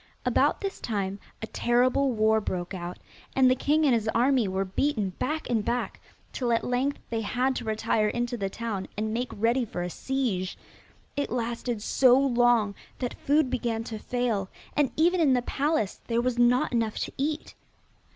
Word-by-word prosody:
About - - +2
this 395 -1 -4
time 200 -3 -2 0.2
a - - 0
terrible 250 +4 +2
war 220 -1 +3
broke 180 -2 -3
out, 175 -1 -5 0.4
and 260 -1 +5
the - - +4
king 300 +4 +2
and 270 - +4
his 225 -2 +1
army 250 -1 +3
were 190 +1 -1
beaten 205 0 0
back 310 +3 -2
and 225 -3 +1
back, 245 +3 -2 0.3
till 245 -2 -1
at 230 - +2
length 255 +3 0
they 225 -1 0
had 255 +4 0
to - - -4
retire 220 0 +1
into 240 +3 -1
the 195 -4 -2
town, 210 -3 -4
and 215 +1 -1
make 245 +2 -1
ready 235 +4 +1
for 180 -6 -4
a 180 - -4
siege. 230 -9 -2 0.6
It 285 -1 -1
lasted 235 -2 -2
so 255 +1 +5
long 240 -5 +3 0.2
that 245 -2 -3
food 290 -2 +1
began 230 -2 -1
to 220 -1 -6
fail, 230 -5 -1 0.3
and 290 -3 +3
even 350 +3 +3
in 295 -5 +4
the 245 -1 +2
palace 280 -7 -1
there 235 0 +1
was 245 0 0
not 245 +1 +4
enough 225 -3 0
to - - -3
eat. 300 +2 -2
240 Hz, 180 wpm, -27 LUFS, 215-260 Hz, 0.6 s, and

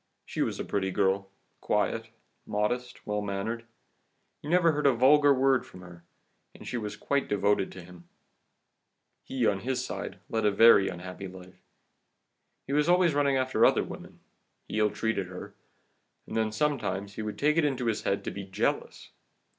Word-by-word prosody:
She - - -4
was - - -1
a - - -3
pretty 95 -1 -1
girl, 95 +1 0 0.3
quiet, - - -1 0.4
modest, 120 +4 -2
well 105 -1 -1
mannered, 105 +4 -3 0.8
you 145 - -7
never 170 -1 +4
heard 150 -1 +1
a 135 - +5
vulgar 145 +4 +5
word 135 -1 +3
from 90 - -13
her, 85 -2 -13 0.5
and - - -12
she - - -4
was 105 -3 -4
quite 140 -1 -1
devoted 100 -1 +1
to 95 - -10
him. 85 -1 -14 1.2
He, 130 -3 -1
on 100 -2 +2
his 125 +2 -2
side, - - -6
led 110 -1 -1
her 105 - +4
a - - -3
very 100 -2 +6
unhappy 90 +2 -7
life. 90 0 -13 1.0
He 140 - -4
was 150 +3 +2
always 180 -2 +4
running 140 -1 +2
after 130 0 +1
other - - +5
women, - - -10 0.5
he 110 - -2
ill 105 0 +4
treated 105 -4 -2
her, 100 +3 -9 0.7
and - - -8
then 110 -1 +1
sometimes 105 -7 -1
he 110 - -5
would 105 -1 -5
take 150 +2 +2
it 165 - +4
into 135 -4 0
his 115 -2 0
head 100 - -1
to - - -4
be 100 - -6
jealous. 95 +2 -2
110 Hz, 180 wpm, -28 LUFS, 100-135 Hz, 1.2 s, very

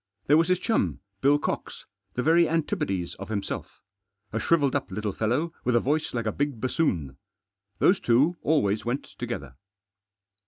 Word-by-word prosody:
There 145 - +5
was 165 +1 +3
his 185 0 +3
chum, 220 +5 0 0.2
Bill 145 +2 +5
Cox, - - -4 0.3
the 125 - 0
very 165 +2 +4
antipodes 100 - -1
of 100 - -7
himself. 100 -3 -4 0.5
A 115 - 0
shrivelled 145 +1 +2
up 140 - -1
little 105 +2 -2
fellow, 130 - 0
with 125 -1 +1
a - - +6
voice 150 +6 0
like 115 -2 -2
a 110 - +1
big 140 -2 -2
bassoon. 90 - -1 0.6
Those 190 +1 +4
two 135 +9 +3
always 110 -10 +2
went 120 +4 -2 0.2
together. 65 -2 -5
130 Hz, 160 wpm, -26 LUFS, 105-160 Hz, 0.6 s, a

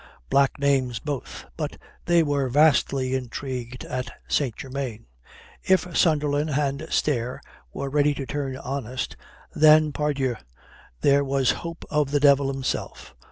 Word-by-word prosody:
Black 140 -1 +3
names 135 -4 +1
both. 145 +2 -5
But - - -4 0.3
they 170 -1 +4
were 140 -3 0
vastly 135 -2 +3
intrigued 125 -1 -4
at 125 -1 -4 0.2
St. 130 -7 0
Germain. 130 - -5 0.6
If 180 -2 +1
Sunderland 150 -2 +2
and 145 +1 -1
Stair 125 -4 0 0.3
were 140 - -4
ready 145 +1 +2
to 135 - -4
turn 135 -2 -3
honest, 130 -2 -4 0.4
then 155 0 +6
pardieu, 140 -5 -1 0.6
there 140 0 +4
was 135 -2 +2
hope 170 0 -6
of 150 -2 +1
the 145 +1 +1
devil 140 -1 +4
himself. 135 - -4
140 Hz, 130 wpm, -25 LUFS, 130-150 Hz, 0.6 s, then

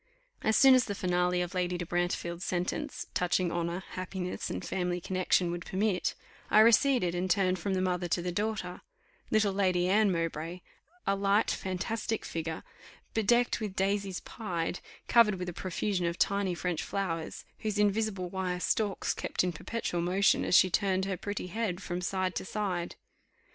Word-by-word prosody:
As 220 - +2
soon 270 -1 +8
as 255 -2 +5
the 205 - -3
finale 180 -1 +1
of 175 - -6
Lady 180 -1 0
de 175 - -4
Brantefield's 175 0 -2
sentence, 185 - -2
touching 180 0 +1
honour, 170 +2 -2
happiness, 185 0 -4
and 90 - -4
family 180 -1 -1
connexion, 185 -1 +1
would 175 0 -4
permit, 190 0 0 0.3
I 215 - +7
receded, 230 -4 +4
and 180 +1 -1
turned 185 -1 +2
from 195 +2 -1
the 185 - 0
mother 180 -1 0
to 175 +1 0
the 180 - -2
daughter, 205 -2 -3 0.5
little 215 -2 +2
Lady 185 -2 +2
Anne 205 +1 +4
Mowbray, 165 0 -3 0.4
a 195 - +2
light 200 +2 +2
fantastic 220 +4 -2
figure, 165 -1 -4 0.5
bedecked 235 +3 +2
with 210 -4 -4
"daisies 195 -1 0
pied," 180 -6 -3 0.3
covered 230 -4 +5
with 180 -1 -4
a - - -6
profusion 185 0 -1
of 170 +1 -2
tiny 200 -2 +1
French 170 -2 -2
flowers, 165 -4 -3
whose 215 -1 -2
invisible 210 -2 +1
wire 180 -1 -2
stalks 205 +1 0
kept - - -1
in 180 - 0
perpetual 175 0 -3
motion 185 +3 +3
as - - +5
she 185 - +5
turned 190 0 +1
her 195 -1 -1
pretty 205 +1 -4
head 185 -1 -2
from 180 -2 -4
side 185 0 -1
to - - -3
side. 185 -4 -3
185 Hz, 170 wpm, -30 LUFS, 175-205 Hz, 0.5 s, soon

